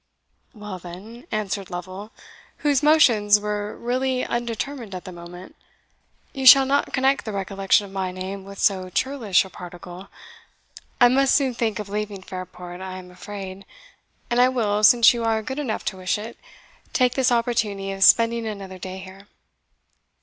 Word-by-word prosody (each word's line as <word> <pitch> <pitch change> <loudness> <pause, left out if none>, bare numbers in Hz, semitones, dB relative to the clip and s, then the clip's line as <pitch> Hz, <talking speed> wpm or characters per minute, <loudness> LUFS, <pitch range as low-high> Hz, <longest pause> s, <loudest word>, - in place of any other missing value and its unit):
"Well, 210 -3 -8
then," 195 +8 -11
answered 205 -2 -3
Lovel, 185 +4 -7 0.5
whose 285 -3 +3
motions 235 -10 +5
were 210 0 -4
really 255 +1 -1
undetermined 235 -1 -4
at 180 - -8
the 185 - -7
moment, 175 +1 -11 0.8
"you 270 - -5
shall 270 +1 +10
not 280 +2 0
connect 270 +1 +1
the 220 - -5
recollection 195 0 +1
of 195 - -12
my 190 -1 -3
name 190 +1 -6
with 200 +1 -11
so 185 -3 +1
churlish 225 -3 +1
a - - -11
particle. 175 +2 -10 0.9
I 245 - +8
must 265 +2 +3
soon 270 -3 +2
think 225 -3 -1
of 210 - -5
leaving 205 -1 -4
Fairport, 180 -1 -8
I 190 0 -6
am 180 -1 -11
afraid 190 +1 -8 0.7
and 240 +1 +3
I 250 - +5
will, 215 -5 0
since 235 +2 +7
you 235 -1 -3
are 220 -1 0
good 265 +6 -5
enough 255 -7 -3
to 190 - -3
wish 185 +3 -1
it, 220 +3 -8 0.6
take 250 -2 +2
this 260 -2 +2
opportunity 225 -5 0
of 195 0 -1
spending 230 +2 +4
another 195 -3 -7
day 185 +1 -7
here." 190 +1 -12
205 Hz, 165 wpm, -23 LUFS, 190-240 Hz, 0.9 s, shall